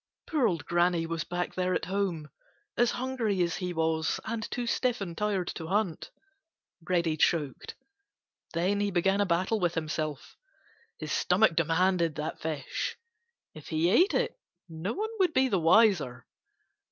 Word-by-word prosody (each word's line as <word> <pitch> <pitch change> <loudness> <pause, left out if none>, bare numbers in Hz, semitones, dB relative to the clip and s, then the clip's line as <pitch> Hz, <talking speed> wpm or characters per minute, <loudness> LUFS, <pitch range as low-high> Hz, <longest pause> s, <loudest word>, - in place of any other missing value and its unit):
Poor 295 -6 +2
old 165 -7 -2
Granny 175 -1 +2
was 165 0 -3
back 175 0 -3
there 185 0 0
at - - -1
home 185 -5 -2 0.4
as 240 - +3
hungry 240 -7 0
as 170 -1 -1
he 180 -1 -3
was 160 -1 0
and 220 -1 -3
too 245 -1 -3
stiff 250 0 0
and 175 -4 -5
tired 200 -3 -1
to 160 - -6
hunt. 190 -3 -1 0.8
Reddy 170 -3 +2
choked. 150 -3 0 0.8
Then 185 +4 +1
he 205 0 +1
began 195 +2 +2
a 200 - +1
battle 185 +6 +1
with 175 -2 0
himself. 155 -2 -4 0.6
His 155 -1 -6
stomach 180 -1 +3
demanded 170 0 +2
that 155 +1 -4
fish. 155 -4 -3 0.6
If 155 - -12
he 160 +3 +1
ate 360 - +4
it, 485 0 -1 0.3
no 165 +5 -4
one 435 +3 -3
would 365 -4 +3
be 265 0 +4
the 195 -5 +2
wiser. 165 - +3
180 Hz, 155 wpm, -29 LUFS, 165-205 Hz, 0.8 s, ate